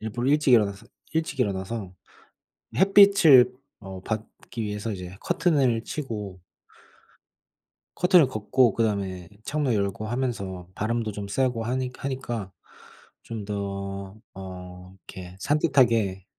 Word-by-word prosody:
일부러 120 +4 -2
일찍 150 -2 +3
일어나서, 105 -1 +3 0.3
일찍 160 -3 -2
일어나서 100 -2 -2 0.8
햇빛을 195 -10 +7 0.3
어 95 -2 -9
받기 110 +2 -5
위해서 105 +1 -3
이제 90 -1 -7
커튼을 135 -10 +1
치고 105 -11 -5 1.6
커튼을 180 -6 +5
걷고 120 +1 +2
그다음에 100 -6 -1 0.2
창문 145 -4 0
열고 100 +1 -1
하면서 110 -7 -3
바람도 110 0 -2
좀 100 0 -6
쐬고 125 0 0
하니 125 +2 -1
하니까 120 -7 -4 0.7
좀 110 -3 -6
더 100 -1 -5 0.2
어 90 -1 -10
이렇게 90 -1 -9
산뜻하게 115 - +2
110 Hz, 250 characters per minute, -25 LUFS, 100-130 Hz, 1.6 s, 햇빛을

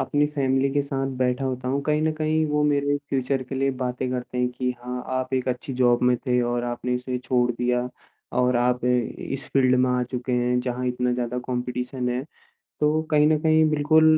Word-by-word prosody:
अपनी 145 +2 +2
फ़ैमिली 135 -2 +1
के 145 +1 +1
साथ 135 -1 -2
बैठा 125 +1 0
होता 130 -1 -3
हूँ 140 +2 0
कहीं 150 +1 +1
न 160 0 +2
कहीं 155 0 +1
वो 150 0 +1
मेरे 145 -1 +2
फ्यूचर 135 0 0
के 130 +1 -7
लिए 135 +1 +1
बातें 125 +1 -2
करते 125 0 -4
हैं 125 0 +2
कि 125 +1 -2
हाँ, 125 0 -4
आप 130 0 -2
एक 130 0 -1
अच्छी 125 +2 -3
जॉब 120 -1 +3
में 125 0 +4
थे 125 -1 +3
और 120 0 -1
आपने 120 +1 -2
उसे 125 0 -3
छोड़ 125 -1 +1
दिया 125 +1 0 0.5
और 125 -1 +3
आप 125 0 +1
इ 125 0 +3 0.4
इस 135 0 -4
फ़ील्ड 130 -2 +4
में 130 - +3
आ 125 0 +1
चुके 125 0 -3
हैं 125 0 +2
जहाँ 125 0 -3
इतना 125 0 0
ज़्यादा 125 0 -2
कॉम्पिटिशन 125 0 -3
है। 125 +1 -1 0.6
तो 150 +1 +2
कहीं 150 0 +5
न 155 0 +3
कहीं 155 0 +4
बिल्कुल 155 +1 +4
125 Hz, 210 wpm, -24 LUFS, 125-140 Hz, 0.6 s, कहीं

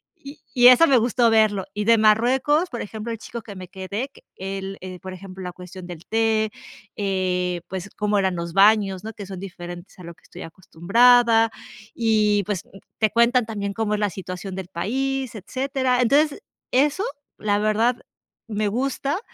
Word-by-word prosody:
Y 290 -3 -12
y 245 -2 +7
eso 255 +7 +8
me 270 - +5
gustó 235 0 +3
verlo. 215 -3 +3
Y 210 - -2
de 230 +2 +5
Marruecos, 255 +10 +3
por 240 - -5
ejemplo, 220 +2 -6
el 230 - -4
chico 235 +2 -8
que 205 -2 -10
me 185 -1 -9
quedé 195 +7 -5
que - - -20
él, 195 +1 -5
eh, 185 0 -8
por 190 0 -7
ejemplo, 190 0 -10
la 180 - -5
cuestión 180 +1 -11
del 175 -1 -10
té, 220 -1 +1 0.5
eh, 180 -3 -1
pues, 190 +1 -6
cómo 210 0 +1
eran 190 -2 0
los 170 0 -5
baños, 200 -1 +4
¿no? 220 - -5
Que 210 -2 -9
son 190 -1 -8
diferentes 175 -1 -9
a - - -10
lo 170 0 -9
que - - -29
estoy - - -11
acostumbrada. 225 +7 +3 0.4
Y, 215 -3 +2
pues, 200 -3 -2 0.4
te 220 - +3
cuentan 235 +2 +3
también 200 -2 -4
cómo 210 0 -1
es - - -3
la 210 -1 +1
situación 185 +1 -7
del 190 -2 -6
país, 260 +7 -2
etcétera. 255 +4 -1
Entonces, 285 - +2 0.3
eso, 290 +8 +2 0.3
la 205 -1 0
verdad, 220 +3 +2 0.5
me 210 -2 -1
gusta. 275 - -1
210 Hz, 180 wpm, -23 LUFS, 190-240 Hz, 0.5 s, eso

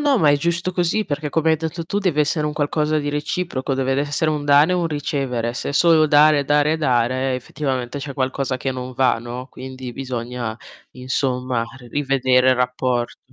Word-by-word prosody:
no. 285 -3 +3
Ma 155 -6 +4
è 145 - +4
giusto 170 +4 -1
così 180 +4 0
perché 150 -2 -3
come 160 +2 +1
hai - - +5
etto 160 +1 -3
tu 165 +1 -6
tu 200 - -2
deve 180 -7 0
essere 150 +1 +1
un 150 - -2
qualcosa 150 +1 0
di 145 -1 -2
reciproco, 150 -2 -2
deve 135 0 0
ve 135 - +1
essere 145 +2 0
un 150 -2 -1
dare 145 +4 +5
e - - +2
un 170 -2 0
ricevere. 135 -6 -2
Se 135 - -3
solo 160 +1 +5
dare, 150 0 +5
dare, 150 +2 +2
dare 130 -2 +1
effettivamente 130 0 -3
c'è 140 0 -6
qualcosa 130 0 -1
che 130 +1 -3
non 130 0 -6
va, 130 -2 +2
no, 120 +2 -7
quindi 130 -1 -8
bisogna 125 -3 -4 0.4
insomma 125 -1 -1 0.2
ri 125 - -14
rivedere 130 -1 +2
il 130 - +5
rapporto. 125 -1 -1
140 Hz, 200 wpm, -21 LUFS, 130-155 Hz, 0.4 s, hai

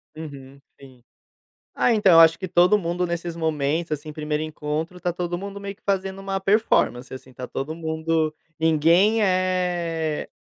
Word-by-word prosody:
Uhum, 140 -3 -10 0.2
sim. 130 -3 -16 0.7
Ah, 245 - +3
então, 205 -4 +4
eu 165 - +8
acho 165 0 +6
que 185 - -4
todo 180 +4 +4
mundo 175 -1 -2
nesses 170 -1 -4
momentos, 160 0 -1
assim, 150 +1 -4
primeiro 150 0 -2
encontro, 155 +3 -4
tá 175 - -1
todo 175 0 -3
mundo 200 +1 -7
meio 200 0 -6
que 215 - -39
fazendo 195 -1 -1
uma 195 0 -3
performance, 195 - +1
assim, 130 0 -11
tá 125 - -7
todo 150 +4 -5
mundo 160 -1 -1 0.3
ninguém 165 +7 +3
é 180 -4 0
165 Hz, 160 wpm, -23 LUFS, 155-185 Hz, 0.7 s, eu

